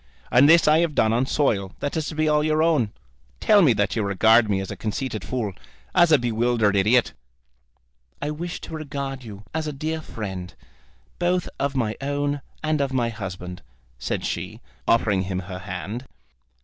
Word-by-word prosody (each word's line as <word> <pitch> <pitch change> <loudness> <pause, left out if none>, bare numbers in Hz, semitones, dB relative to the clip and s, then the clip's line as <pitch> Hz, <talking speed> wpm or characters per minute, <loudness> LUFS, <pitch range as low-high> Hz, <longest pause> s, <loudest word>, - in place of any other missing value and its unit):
And 130 +5 +6
this 165 -1 +6
I 155 +1 +6
have 165 -3 0
done 110 0 +3
on 125 +3 +1
soil 100 -11 0
that 145 - -3
is 160 -2 -1
to 155 - -5
be 155 0 +1
all 150 0 +3
your 155 0 +2
own. 145 -11 +2 0.5
Tell 210 -2 +5
me 155 -8 +6
that 100 -1 0
you 115 - 0
regard 110 +3 +4
me 100 -2 +1
as 95 - -5
a - - -4
conceited 110 0 -3
fool, 115 -6 -3 0.4
as 175 -2 +5
a 155 - +8
bewildered 115 -3 +1
idiot." 110 +5 +3 1.1
"I 150 - -2
wish 165 +3 -5
to - - -9
regard 140 -3 -5
you 105 -3 -10
as 160 0 -2
a - - -2
dear 155 +3 -3
friend, 95 -9 -6 0.6
both 180 0 +1
of 140 0 -1
my 115 -4 -1
own 145 +1 -1 0.2
and 155 -1 +1
of 140 -1 0
my 120 -3 +1
husband," 95 -5 -7 0.4
said - - -2
she, - - -4 0.3
offering 105 -4 +3
him 95 0 -2
her 90 0 -7
hand. 100 +7 -6
125 Hz, 185 wpm, -24 LUFS, 105-150 Hz, 1.1 s, a